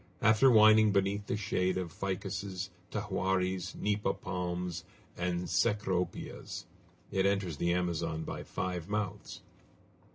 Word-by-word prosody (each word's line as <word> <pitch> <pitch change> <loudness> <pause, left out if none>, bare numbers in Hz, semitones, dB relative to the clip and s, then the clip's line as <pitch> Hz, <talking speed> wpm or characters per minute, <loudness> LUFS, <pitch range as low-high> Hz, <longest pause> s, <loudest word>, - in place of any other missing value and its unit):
After 110 +5 +6
winding 110 -2 +7
beneath 100 +1 +1
the - - 0
shade 95 -2 0
of 90 -3 -3
ficuses, 95 -1 -3 0.2
tahuaris, 95 0 -1
nipa 105 -1 0
palms, 90 -2 -3 0.3
and 90 0 -1
cecropias, 95 0 -1 0.5
it 95 0 +2
enters 95 -6 0
the 85 +3 +1
Amazon 85 -3 -1
by - - -5
five 90 -1 -4
mouths. 105 -2 -3
95 Hz, 110 wpm, -32 LUFS, 90-100 Hz, 0.5 s, winding